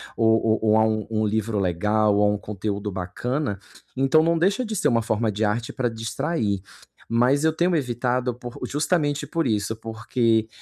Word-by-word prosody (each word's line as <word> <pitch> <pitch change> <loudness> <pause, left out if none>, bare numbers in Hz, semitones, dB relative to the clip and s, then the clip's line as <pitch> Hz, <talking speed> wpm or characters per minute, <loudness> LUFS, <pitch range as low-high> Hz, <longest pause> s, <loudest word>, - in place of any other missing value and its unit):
ou 110 -1 +4
ou 110 -1 +2
ou 110 0 +4
a 110 - +4
um 110 -1 -1
um 110 -1 +1
livro 110 0 -1
legal 105 +4 +2
ou 105 - +3
a 105 0 +3
um 105 - -1
conteúdo 105 0 -4
bacana, 100 +6 -3 0.4
então 135 +4 +4
não 165 0 +2
deixa 200 +8 +2
de 220 -1 -4
ser - - +2
uma 115 -1 +2
forma 110 0 0
de 105 +1 -2
arte 110 +3 -1
para 125 -2 0
distrair, 115 - -2 0.5
mas 125 +6 +3
eu 160 - +4
tenho 175 +2 +1
evitado 125 -2 -1
por 120 0 -9
justamente 145 -1 0
por 165 -2 -1
isso, 110 -2 0
porque, 110 0 0
115 Hz, 185 wpm, -24 LUFS, 105-135 Hz, 0.5 s, ou